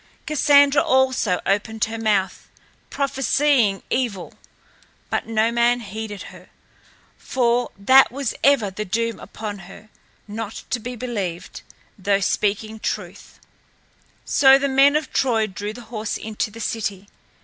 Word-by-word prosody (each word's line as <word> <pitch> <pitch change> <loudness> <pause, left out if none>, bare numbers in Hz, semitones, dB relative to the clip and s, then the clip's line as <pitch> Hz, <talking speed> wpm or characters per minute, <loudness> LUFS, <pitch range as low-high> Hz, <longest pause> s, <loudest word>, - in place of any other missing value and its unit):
Cassandra 285 -1 +4
also 260 -8 +2
opened 210 +2 0
her 225 0 -6
mouth, 205 -4 -1 0.4
prophesying 270 -6 +1
evil; 235 -8 -2 0.8
but - - -1
no 225 0 +1
man 235 +1 +2
heeded 210 -1 -7
her, - - -15 0.7
for 245 -1 0
that 260 +5 +5
was 275 -1 -3
ever 260 -8 +3
the 210 +3 -4
doom 230 +3 -2
upon 210 -2 -7
her, 215 +2 -14 0.4
not 215 +1 -6
to 250 - 0
be 245 +2 -6
believed, 200 -7 -5 0.4
though 200 +1 +1
speaking 210 +2 -1
truth. - - -6 0.9
So 270 -1 +6
the 280 +1 -1
men 275 +2 +4
of 300 -3 -2
Troy 230 -5 +2
drew 205 +1 -6
the 240 +3 -10
horse 215 -1 -3
into 220 0 -4
the 225 +2 -12
city. 205 -3 -3
225 Hz, 130 wpm, -22 LUFS, 205-260 Hz, 0.9 s, So